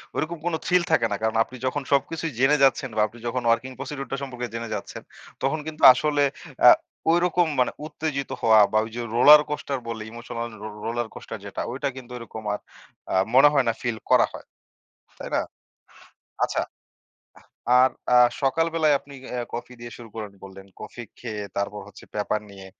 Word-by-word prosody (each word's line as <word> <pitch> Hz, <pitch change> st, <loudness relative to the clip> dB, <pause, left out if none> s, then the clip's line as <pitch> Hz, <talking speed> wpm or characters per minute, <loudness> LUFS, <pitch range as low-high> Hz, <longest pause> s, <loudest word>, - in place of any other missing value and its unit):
ঐরকম 165 Hz, +2 st, -2 dB
কোন 175 Hz, -, 0 dB
থ্রিল 180 Hz, 0 st, +3 dB
থাকে 120 Hz, -7 st, +4 dB
না। -, -, +1 dB
কারণ 110 Hz, 0 st, 0 dB
আপনি 130 Hz, -, -13 dB
যখন 145 Hz, +3 st, -1 dB
সবকিছুই 155 Hz, +3 st, 0 dB
জেনে 145 Hz, +3 st, +4 dB
যাচ্ছেন 135 Hz, 0 st, +3 dB
বা 105 Hz, -, +2 dB
আপনি 120 Hz, -, -16 dB
যখন 125 Hz, +1 st, -1 dB
ওয়ার্কিং 120 Hz, +3 st, +1 dB
প্রসিডিউর 135 Hz, 0 st, -6 dB
টা 135 Hz, -, -1 dB
সম্পর্কে 125 Hz, -2 st, -5 dB
জেনে 115 Hz, -1 st, -4 dB
যাচ্ছেন 100 Hz, -, -7 dB, 0.4 s
তখন 150 Hz, +4 st, +1 dB
কিন্তু 155 Hz, -1 st, -7 dB
আসলে 145 Hz, +2 st, +1 dB, 0.4 s
আ -, -, +13 dB, 0.4 s
ঐরকম 175 Hz, 0 st, +2 dB
মানে 125 Hz, -, +3 dB
উত্তেজিত 150 Hz, -3 st, -4 dB
হওয়া 110 Hz, -1 st, +6 dB
বা 110 Hz, -, +2 dB
ওই -, -, -8 dB
যে 120 Hz, -, -3 dB
রোলার 150 Hz, +4 st, +9 dB
কোস্টার 140 Hz, -2 st, -3 dB
বলে 115 Hz, -1 st, -4 dB
ইমোশনাল 120 Hz, 0 st, -6 dB, 0.4 s
রোলার 120 Hz, 0 st, -2 dB
কোস্টার 115 Hz, -, -8 dB
যেটা 100 Hz, -, -5 dB
ওইটা 135 Hz, +2 st, -2 dB
কিন্তু 125 Hz, -2 st, -11 dB
ঐরকম 110 Hz, -2 st, -9 dB
আর -, -, -3 dB, 0.5 s
আ -, -, -1 dB, 0.2 s
মনে 135 Hz, +3 st, +8 dB
হয় 135 Hz, -3 st, +3 dB
না 115 Hz, -, +2 dB
ফিল 120 Hz, -3 st, -2 dB
করা -, -, +6 dB
হয়, -, -, -10 dB, 0.7 s
তাই -, -, -7 dB
না? -, -, +2 dB, 1.0 s
আচ্ছা, -, -, -1 dB, 1.2 s
আর 130 Hz, -, +5 dB, 0.2 s
আ -, -, +7 dB, 0.3 s
সকাল 165 Hz, +5 st, +2 dB
বেলায় 155 Hz, -3 st, +3 dB
আপনি 140 Hz, 0 st, -14 dB, 0.2 s
আ -, -, -2 dB, 0.2 s
কফি 120 Hz, +1 st, -6 dB
দিয়ে 120 Hz, 0 st, -8 dB
শুরু 120 Hz, -2 st, -11 dB
করেন 105 Hz, -2 st, -6 dB
বললেন। 95 Hz, 0 st, -12 dB
কফি 120 Hz, +3 st, -8 dB, 0.2 s
খেয়ে 110 Hz, -4 st, -5 dB
তারপর 100 Hz, +1 st, -2 dB
হচ্ছে 100 Hz, -, -14 dB
পেপার 105 Hz, 0 st, -1 dB
নিয়ে 95 Hz, -1 st, -11 dB
125 Hz, 180 wpm, -24 LUFS, 115-145 Hz, 1.2 s, আ